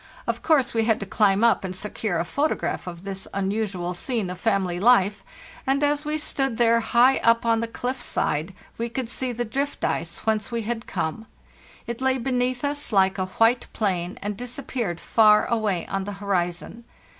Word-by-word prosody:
Of -, -, -2 dB
course 275 Hz, -5 st, +3 dB
we 225 Hz, -1 st, +1 dB
had 220 Hz, -1 st, +2 dB
to -, -, -3 dB
climb 200 Hz, +1 st, +2 dB
up 235 Hz, -3 st, +4 dB
and 185 Hz, -1 st, -4 dB
secure 205 Hz, -1 st, -2 dB
a 170 Hz, -, -1 dB
photograph 285 Hz, -, -1 dB
of 170 Hz, 0 st, -7 dB
this 195 Hz, -1 st, -6 dB
unusual 195 Hz, -3 st, -1 dB
scene 210 Hz, 0 st, -2 dB
of 180 Hz, -, -7 dB
family 190 Hz, -5 st, 0 dB
life, 205 Hz, -2 st, +4 dB, 0.4 s
and 275 Hz, +2 st, +2 dB
as 290 Hz, +1 st, +1 dB
we 305 Hz, +1 st, -1 dB
stood 270 Hz, -5 st, -1 dB
there 230 Hz, -1 st, +4 dB
high 240 Hz, +3 st, +4 dB
up 230 Hz, 0 st, +3 dB
on 230 Hz, -1 st, +3 dB
the 230 Hz, -, -2 dB
cliff's 245 Hz, +2 st, -4 dB
side 160 Hz, +6 st, -1 dB, 0.2 s
we 235 Hz, +1 st, -1 dB
could 240 Hz, 0 st, -4 dB
see 255 Hz, +1 st, -2 dB
the 240 Hz, 0 st, -3 dB
drift 275 Hz, +5 st, -2 dB
ice 170 Hz, +1 st, -2 dB
whence 220 Hz, -1 st, 0 dB
we 230 Hz, -1 st, -2 dB
had 225 Hz, +1 st, -4 dB
come. 215 Hz, +8 st, -3 dB, 0.6 s
It 235 Hz, +1 st, -5 dB
lay 265 Hz, 0 st, +2 dB
beneath 250 Hz, 0 st, -1 dB
us 290 Hz, -1 st, -2 dB
like 190 Hz, -1 st, +3 dB
a 185 Hz, -, -1 dB
white 225 Hz, +6 st, +2 dB
plain, 185 Hz, -4 st, -1 dB
and 205 Hz, 0 st, -2 dB
disappeared 245 Hz, -5 st, -4 dB
far 215 Hz, -2 st, +5 dB
away 215 Hz, -7 st, 0 dB
on 195 Hz, -1 st, -3 dB
the 205 Hz, -, -5 dB
horizon. 195 Hz, +2 st, -2 dB
225 Hz, 190 wpm, -24 LUFS, 195-245 Hz, 0.6 s, far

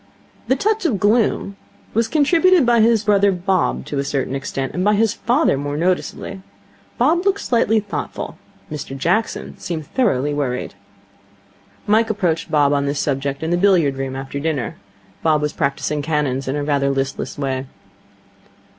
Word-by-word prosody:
The 260 Hz, -, +3 dB
touch 435 Hz, -, 0 dB
of 210 Hz, -10 st, -1 dB
gloom 205 Hz, -1 st, +1 dB, 0.4 s
was 225 Hz, +1 st, +2 dB
contributed 325 Hz, +4 st, +4 dB
by 235 Hz, -1 st, +4 dB
his 225 Hz, -1 st, +4 dB
brother 200 Hz, -1 st, +4 dB
Bob 175 Hz, -, 0 dB
to 140 Hz, -, -3 dB
a -, -, 0 dB
certain 135 Hz, -1 st, -2 dB
extent, 135 Hz, -1 st, -3 dB
and 180 Hz, -, -1 dB
by 210 Hz, +1 st, +3 dB
his 220 Hz, 0 st, +2 dB
father 240 Hz, -, +1 dB
more 145 Hz, +1 st, -3 dB
noticeably. 185 Hz, +3 st, -2 dB, 0.6 s
Bob 320 Hz, +8 st, +3 dB
looked 400 Hz, 0 st, +1 dB
slightly 225 Hz, -2 st, +2 dB
thoughtful. 210 Hz, -1 st, -5 dB, 0.4 s
Mr 140 Hz, -2 st, -6 dB
Jackson 180 Hz, +11 st, -1 dB
seemed 160 Hz, -3 st, -4 dB
thoroughly 150 Hz, -, 0 dB
worried. 130 Hz, -4 st, -2 dB, 1.1 s
Mike 220 Hz, +2 st, +3 dB
approached 175 Hz, -7 st, -1 dB
Bob 145 Hz, -2 st, +3 dB
on 140 Hz, 0 st, +1 dB
the 140 Hz, -, -1 dB
subject 140 Hz, 0 st, -2 dB
in 160 Hz, -, -1 dB
the 175 Hz, -, +2 dB
billiard 175 Hz, -7 st, +3 dB
room 135 Hz, -1 st, -3 dB
after 135 Hz, +1 st, -5 dB
dinner. 145 Hz, -5 st, -2 dB, 0.4 s
Bob 155 Hz, -2 st, +3 dB
was 150 Hz, 0 st, -2 dB
practising 145 Hz, 0 st, -1 dB
cannons 145 Hz, -3 st, -1 dB
in 135 Hz, -, -1 dB
rather 140 Hz, -2 st, +1 dB
a -, -, +2 dB
listless 135 Hz, 0 st, -2 dB
way. 135 Hz, -2 st, -2 dB
160 Hz, 160 wpm, -20 LUFS, 140-220 Hz, 1.1 s, contributed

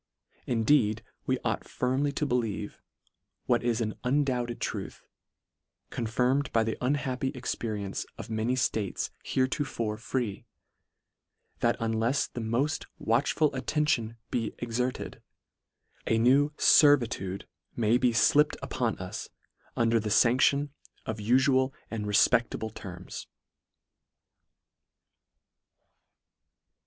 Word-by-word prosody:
Indeed 115 Hz, -2 st, +2 dB, 0.2 s
we -, -, +2 dB
ought -, -, 0 dB
firmly 130 Hz, +3 st, 0 dB
to 150 Hz, -, -1 dB
believe, 120 Hz, -7 st, -2 dB, 0.6 s
what 120 Hz, -1 st, +2 dB
is 120 Hz, -1 st, 0 dB
an 110 Hz, -2 st, -1 dB
undoubted 125 Hz, -3 st, 0 dB
truth, -, -, -5 dB, 0.9 s
confirm 125 Hz, +3 st, +1 dB
ed 145 Hz, -, -4 dB
by 115 Hz, -, +3 dB
the 110 Hz, 0 st, -2 dB
unhappy 130 Hz, 0 st, 0 dB
experience 110 Hz, -5 st, -3 dB
of -, -, -7 dB
many 110 Hz, +3 st, 0 dB
ftates 110 Hz, -6 st, -1 dB
heretofore 130 Hz, -5 st, -1 dB
free, 115 Hz, -2 st, -3 dB, 1.1 s
that -, -, +2 dB
unlefs 115 Hz, +4 st, 0 dB
the 120 Hz, -, -4 dB
moft 120 Hz, +7 st, -1 dB
watch 115 Hz, +5 st, +1 dB
ful 155 Hz, -2 st, +2 dB
attention 130 Hz, -5 st, 0 dB
be 115 Hz, -3 st, -2 dB
exerted, 120 Hz, +2 st, -3 dB, 0.9 s
a 115 Hz, -, +3 dB
new 135 Hz, +6 st, +4 dB
fervitude 120 Hz, -10 st, +4 dB, 0.3 s
may 115 Hz, +1 st, +2 dB
be 125 Hz, -1 st, +3 dB
llipped 150 Hz, +5 st, +4 dB
upon 120 Hz, -4 st, -1 dB
us 95 Hz, 0 st, -6 dB, 0.5 s
under 115 Hz, -1 st, +3 dB
the 105 Hz, 0 st, -3 dB
fandb'on 130 Hz, +6 st, +4 dB, 0.4 s
of 110 Hz, 0 st, -4 dB
ufual 130 Hz, +4 st, +3 dB, 0.2 s
and 105 Hz, -2 st, -3 dB
refpedtable 110 Hz, +1 st, +2 dB
terms. 90 Hz, -3 st, -8 dB
120 Hz, 105 wpm, -28 LUFS, 110-130 Hz, 1.1 s, new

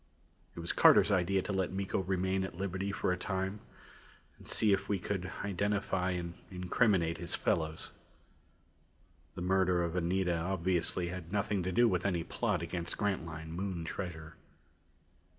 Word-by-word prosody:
It -, -, -7 dB
was 85 Hz, -, 0 dB
Carter's -, -, +6 dB
idea 95 Hz, 0 st, +2 dB
to 100 Hz, -, -3 dB
let 95 Hz, -2 st, 0 dB
Miko 95 Hz, 0 st, -1 dB
remain 95 Hz, 0 st, 0 dB
at 85 Hz, -2 st, -6 dB
liberty 95 Hz, +1 st, -2 dB
for 95 Hz, -, 0 dB
a 90 Hz, -, 0 dB
time 95 Hz, 0 st, -2 dB, 0.8 s
and -, -, -14 dB
see 105 Hz, -2 st, +3 dB
if 100 Hz, 0 st, -1 dB
we 100 Hz, -, +2 dB
could 90 Hz, -1 st, -3 dB
identify 100 Hz, -1 st, 0 dB
and 85 Hz, -2 st, -3 dB, 0.2 s
incriminate 90 Hz, -2 st, +1 dB
his 85 Hz, -1 st, -2 dB
fellows. 80 Hz, -1 st, -1 dB, 1.4 s
The 90 Hz, -, -4 dB
murder 90 Hz, -1 st, +3 dB
of 85 Hz, 0 st, -2 dB
Anita 90 Hz, 0 st, +1 dB
obviously 90 Hz, 0 st, 0 dB
had 90 Hz, -2 st, -7 dB
nothing 100 Hz, -1 st, 0 dB
to 90 Hz, +1 st, -1 dB
do 120 Hz, +5 st, +5 dB
with 90 Hz, -4 st, +1 dB
any 90 Hz, -4 st, 0 dB
plot 100 Hz, -3 st, -1 dB
against 85 Hz, 0 st, -3 dB
Grantline 80 Hz, -6 st, -2 dB
Moon 90 Hz, -1 st, -3 dB
treasure. 80 Hz, -3 st, -5 dB
95 Hz, 150 wpm, -33 LUFS, 85-95 Hz, 1.4 s, Carter's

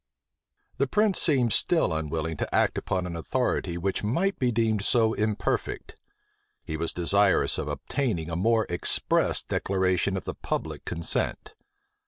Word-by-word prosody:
The 140 Hz, -, +1 dB
prince 210 Hz, +3 st, +2 dB
seemed 130 Hz, -8 st, +2 dB
still 165 Hz, -, +2 dB
unwilling 80 Hz, +1 st, -2 dB
to -, -, -3 dB
act -, -, +3 dB
upon 90 Hz, -1 st, -2 dB
an 85 Hz, -1 st, -5 dB
authority 90 Hz, -2 st, -1 dB
which 95 Hz, +4 st, -2 dB
might 170 Hz, -, 0 dB
be 125 Hz, -2 st, +2 dB
deemed 110 Hz, -3 st, +1 dB
so 110 Hz, 0 st, +3 dB
imperfect: 105 Hz, -1 st, -2 dB, 0.7 s
he 80 Hz, -, -5 dB
was 80 Hz, +1 st, -2 dB
desirous 95 Hz, +3 st, +2 dB
of -, -, -3 dB
obtaining 110 Hz, -, -2 dB
a -, -, -2 dB
more 110 Hz, +5 st, +2 dB
express 85 Hz, 0 st, +1 dB
declaration 95 Hz, 0 st, 0 dB
of -, -, -6 dB
the -, -, -3 dB
public -, -, -4 dB
consent. 85 Hz, -1 st, -2 dB
100 Hz, 145 wpm, -27 LUFS, 85-120 Hz, 0.7 s, act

